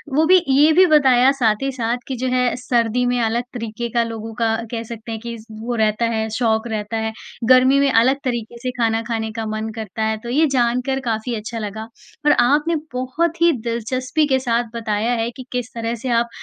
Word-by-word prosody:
वो 310 +2 +4
भी 370 - +9 0.2
ये 300 +2 +6
भी 375 - +8
बताया 260 -3 +5
साथ 215 -3 +2
ही 275 - 0
साथ 240 -2 -1
कि 265 - -3
जो - - +1
है 250 -1 +2
सर्दी 245 -1 0
में 245 - 0
अलग 230 +1 0
तरीके 235 0 -4
का 235 - +4
लोगों 225 -1 -6
का 225 -1 +2 0.2
कह 230 -1 -3
सकते 225 0 -9
हैं 220 - -4
कि 235 - -4 0.2
वो 225 +3 -4
रहता 215 +2 +1
है 220 0 -1
शौक 225 -1 +1
रहता 220 0 -3
है। 220 - -2 0.4
गर्मी 260 +2 +5
में 280 -1 +3
अलग 255 +3 +4
तरीके 240 -2 -3
से 255 - -1
खाना 225 -1 +2
खाने 220 -1 -2
का 225 0 -4
मन 215 +1 -3
करता 220 -1 -4
है, 220 0 0
तो 235 +2 -9
ये 305 +6 +3
जानकर 250 +3 +1
काफ़ी 225 +2 -2
अच्छा 225 +2 -5
लगा। 215 0 -5 0.4
और 295 - +6 0.2
आपने 300 +4 +2 0.2
बहुत 315 +7 -1
ही 340 0 +6 0.2
दिलचस्पी 255 +6 -1
के 265 -2 +2
साथ 230 0 0
बताया 220 0 -1
है 230 - -1
कि 255 - -9
किस 245 -1 -4
तरह 230 0 -2
से - - -1
आप 235 - -4
235 Hz, 215 wpm, -20 LUFS, 225-255 Hz, 0.4 s, भी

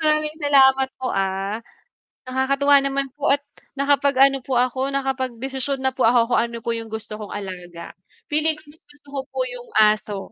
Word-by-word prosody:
Maraming 305 0 +1
salamat 270 -3 +4
po, 255 - -2
ah. 195 +2 -1 0.7
Nakakatuwa 275 +2 +3
naman 275 0 -1
po - - 0
at 285 - -4 0.3
nakapag-ano 275 -1 +3
po 265 - -1
ako 255 +2 +1
nakapagdesisyon 265 0 -2
na 265 - +2
po 255 -3 +1
ako 235 0 +3
kung - - +4
ano 235 0 -3
po 235 - -2
yung 230 0 -4
gusto 220 -1 -6
kong 210 -1 -7
alaga. 180 -4 -7 0.4
Feeling 310 +1 +2
ko 305 - -15
mas 315 - -21
gusto 290 0 -20
ko 275 -1 -3
po - - -9
'yong - - -7
aso, 210 -1 +3
265 Hz, 175 wpm, -22 LUFS, 230-280 Hz, 0.7 s, salamat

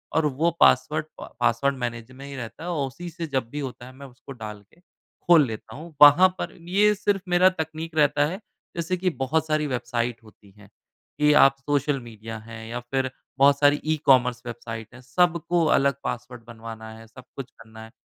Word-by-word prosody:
और 160 - +3
वो 150 +4 +1
पासवर्ड 150 +4 +4
प - - -8
पासवर्ड 120 +3 +1
मैनेजर 120 0 -5
में 135 - -10
ही 140 0 -8
रहता 125 +4 -8
है 175 - -4
और 145 -6 -1
उसी 175 +7 -8
से 165 +1 -6
जब 130 -5 -2
भी 145 +4 -6
होता 125 -3 -6
है 130 - -12
मैं 140 +1 -11
उसको 130 +1 -14
डाल 110 -4 -7 0.2
के - - -24 0.5
खोल 165 -4 +7
लेता 110 -2 -8
हूँ। 160 +3 -10
वहाँ 145 +6 +9
पर - - -4 0.2
ये 210 +3 +4
सिर्फ़ 200 -1 0
मेरा 180 +1 +5
तकनीक 160 +1 -5
रहता 145 -1 +3
है। 185 +5 -5 0.4
जैसे 170 +2 -2
कि 185 +1 0
बहुत 155 +1 -1
सारी 155 -1 0
वेबसाइट 120 -2 -3
होती 105 -2 -19
हैं 105 -1 -17 0.5
कि 150 0 +4
आप 135 0 +5
सोशल 145 0 0
मीडिया 115 -1 -9
है 110 -1 -9
या 120 +1 -4
फिर 130 +2 -2 0.3
बहुत 140 +1 +5
सारी 145 0 +4
ई-कॉमर्स 125 -5 +3
वेबसाइट 115 -1 -7
है। 120 - -13
सबको 170 +5 +1
अलग 140 -2 +3
पासवर्ड 120 -1 -6
बनवाना 115 -1 -9
है, 115 0 -14
सब 125 +3 -14
कुछ 135 -2 -7
करना 110 -1 -14
है। 110 - -13
135 Hz, 200 wpm, -24 LUFS, 120-155 Hz, 0.5 s, वहाँ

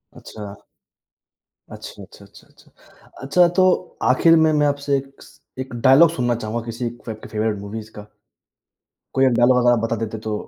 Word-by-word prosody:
अच्छा। 105 -2 -10 1.2
अच्छा, - - -10
अच्छा, - - -16
अच्छा, - - -19
अच्छा। - - -25 0.5
अच्छा, 175 +6 +3
तो 185 +1 0
आखिर 165 +6 +5
में, 160 -1 +3
मैं 150 -1 +2
आपसे 140 0 -1
एक 135 0 -10
स - - -18 0.2
एक 130 -2 -6
डायलॉग 135 +7 +5
सुनना 125 -6 -1
चाहूँगा 115 0 -4
किसी 120 +1 -4 0.2
फ़े 110 - -3
फ़ेवरेट 110 -1 -2
मूवीज़ 110 +2 -8
का। 105 -1 -12 1.1
कोई 135 - +3
एक 130 - +3
डायलॉग 120 +2 +3
अगर 120 - +4
आप 120 - +2
बता 115 +1 -2
देते 110 0 -7
तो 110 - -2
125 Hz, 170 wpm, -20 LUFS, 110-145 Hz, 1.2 s, आखिर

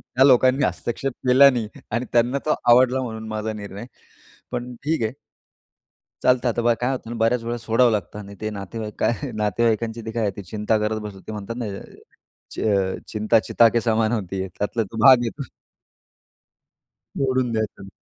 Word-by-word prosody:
त्या 130 - +5
लोकांनी 130 +1 +4
हस्तक्षेप 135 +3 -3 0.2
केला 135 +2 +8
नाही 120 -5 -2 0.2
आणि 120 +3 -1
त्यांना 120 +3 +3
तो 155 - +2 0.2
आवडला 130 +1 +5
म्हणून 110 -3 -6
माझा 110 0 -3
निर्णय. 100 +1 -8 0.7
पण 125 +1 -4
ठीक 155 -5 0
आहे. 110 - 0 1.1
चालतं 125 0 +3
आता 120 - -1
बा 120 0 +3
काय 125 +2 +1
होतं 125 -3 -5
ना, 120 - -5
बऱ्याच 115 +1 +1
वेळा 120 +1 -3
सोडावं 115 +1 +2
लागतं 105 0 -3
आणि 100 0 -10
ते 110 - -2
नातेवाईक, 105 +1 -6
काय 125 +3 -1
नातेवाईकांची 110 +2 0
ती 110 - -4
काय 110 -3 -1
चिंता 105 +4 -1
करत 110 +1 -1
बसतात. 100 -2 -8
ते - - -5
म्हणतात 105 +2 -6
ना, 120 - -3 0.9
"च - - -7 0.5
चिंता 110 +1 +2
चिता 115 +1 +4
के 115 0 0
समान 110 -1 +1
होती 95 -5 -3
है." 95 - -3
त्यातला 110 +2 -1
भाग 125 +3 +7
आहे 115 - -1
तो. 140 0 -8 1.7
सोडून 130 -3 0
द्यायचं. 110 -3 -3
115 Hz, 170 wpm, -23 LUFS, 110-125 Hz, 1.7 s, केला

